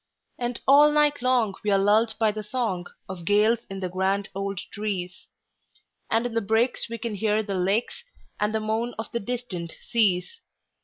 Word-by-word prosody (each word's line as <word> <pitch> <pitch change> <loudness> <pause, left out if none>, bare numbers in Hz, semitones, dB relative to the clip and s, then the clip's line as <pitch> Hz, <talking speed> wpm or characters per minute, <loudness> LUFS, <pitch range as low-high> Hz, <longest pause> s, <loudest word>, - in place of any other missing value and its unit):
And 240 -1 -2
all 290 +2 +7
night 295 -2 +3
long 245 -5 +2
we 210 - 0
are 200 - +4
lulled 215 +3 +3
by 220 -2 +3
the 215 +1 -5
songOf 190 -5 -4
gales 210 +5 +3
in 195 0 -6
the 185 - -1
grand 190 +3 -1
old 195 0 -3 0.2
trees; 190 -3 -4 0.8
And 230 +2 +1
in 245 - -3
the 230 - +1
breaks 225 +4 +1
we 230 - -4
can 230 0 -4
hear 215 +1 +1
the 200 -1 -4
lakesAnd 210 - -2
the 220 - +1
moan 220 +3 -2
of 225 - -5
the 235 - -1
distant 200 -7 -5
seas. 220 - +1
215 Hz, 170 wpm, -25 LUFS, 195-235 Hz, 0.8 s, all